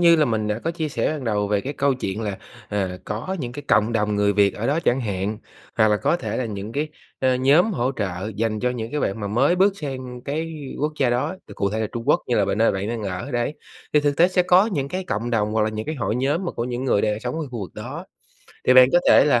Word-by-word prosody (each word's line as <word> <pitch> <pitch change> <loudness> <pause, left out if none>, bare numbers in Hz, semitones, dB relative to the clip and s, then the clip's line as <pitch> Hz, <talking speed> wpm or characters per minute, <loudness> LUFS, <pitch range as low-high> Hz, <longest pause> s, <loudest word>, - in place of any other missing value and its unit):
như 170 -1 +7
là 155 - +4
mình 110 -3 -1
đã 105 +1 -1
có 160 - -2
chia 165 -2 -3
sẻ 150 - -1
ban 150 -4 -2
đầu 105 -2 0
về 105 -1 +1
cái 135 +7 -4
câu 140 -1 +1
chuyện 105 -4 -4
là, 105 -3 -3 0.3
à, 95 -3 -2
có 115 - -4
những 120 -3 -4
cái 145 +3 -7
cộng 110 +2 +3
đồng 105 -2 +1
người 100 0 +3
Việt 100 -1 +3
ở 115 - -3
đó 145 +5 +1
chẳng 125 +2 +2
hạn, 105 -1 -2 0.4
hoặc 110 -1 +4
là 105 - +3
có 170 - +1
thể - - -4
là 130 - -1
những 105 -1 -5
cái, 150 +4 -1 0.3
ơ, 130 -1 +2
nhóm 145 - +4
hỗ 130 -5 0
trợ 95 0 -3
dành 110 -1 -1
cho 125 - +1
những 115 -2 -4
cái 150 - -2
bạn 100 +3 -1
mà 105 - -3
mới 135 - +2
bước 195 +2 +4
sang 130 -5 -6
cái 160 +3 -3 0.2
quốc 150 +2 0
gia 130 -3 +3
đó, 125 +10 -1
thì - - -10
cụ 100 - -1
thể 110 +2 -2
là 110 - 0
Trung 115 -1 -5
Quốc - - +4
như 120 - +1
là 105 - +3
b - - -4
nơi 115 +1 +3
bạn 95 +2 -3
đang 115 -1 -3
ở, 95 +6 -4
đấy, 120 +3 -1 0.4
thì 150 - +5
thực 145 -1 0
tế 175 +2 +5
sẽ 185 -1 +2
có 180 +3 +5
những 145 -11 -2
cái 185 +5 -3
cộng 115 - -2
đồng 105 -2 +1
hoặc 110 0 +2
là 110 - +2
những 110 +3 -5
cái 155 - -2
hội 115 -4 -1
nhóm 140 +8 0
mà 175 - -1
của 115 - -3
những 125 +1 -3
người 105 -6 +2
đang 105 0 0
sống 125 +1 -3
ở 160 -2 -3
khu 120 -3 -5
vực 95 - -7
đó. - - -7 0.6
Thì 130 - +6
bạn 130 0 +9
có 175 - +6
thể - - +7
là 125 -5 +4
120 Hz, 290 wpm, -23 LUFS, 105-145 Hz, 0.6 s, bạn